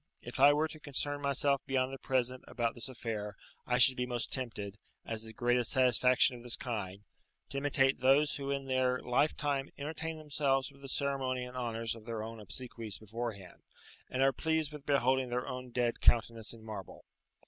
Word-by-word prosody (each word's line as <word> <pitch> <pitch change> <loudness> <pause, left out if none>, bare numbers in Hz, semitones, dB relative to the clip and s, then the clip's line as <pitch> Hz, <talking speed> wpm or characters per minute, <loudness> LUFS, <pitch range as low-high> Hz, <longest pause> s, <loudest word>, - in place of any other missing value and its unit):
"If - - -7
I 140 +2 +9
were 150 +2 +2
to 155 0 -11
concern 145 0 -2
myself 140 0 +2
beyond 130 -1 +1
the 135 - -6
present 130 -1 0
about 115 -1 -1
this 120 +2 -4
affair, 110 -4 -4 0.3
I 125 - +2
should 130 +1 +7
be 125 0 -1
most 120 -2 -2
tempted, 105 -6 -4 0.3
as 110 -1 -3
the 110 0 -6
greatest 120 +1 +1
satisfaction 125 0 +4
of 120 - -10
this 120 0 -2
kind, 100 -5 -4 0.5
to 140 - -2
imitate 135 -1 +2
those 140 +4 +4
who 140 -1 -4
in 140 -1 -1
their 130 -1 +2
lifetime 140 +1 +1
entertain 160 +2 -4
themselves 140 -3 0
with 140 0 -19
the 135 - -7
ceremony 135 -2 0
and 125 0 -8
honours 115 -2 -2
of 115 -2 -11
their 115 -2 -3
own 115 0 -7
obsequies 115 -1 -4
beforehand, 110 -3 -6 0.5
and 130 +1 +1
are 135 0 +4
pleased 160 0 0
with 150 -1 -10
beholding 130 -2 +3
their 125 +1 -2
own 125 0 -5
dead 120 -1 0
countenance 115 -1 +3
in 115 -2 -11
marble. 105 -4 -8
125 Hz, 185 wpm, -33 LUFS, 115-140 Hz, 0.5 s, I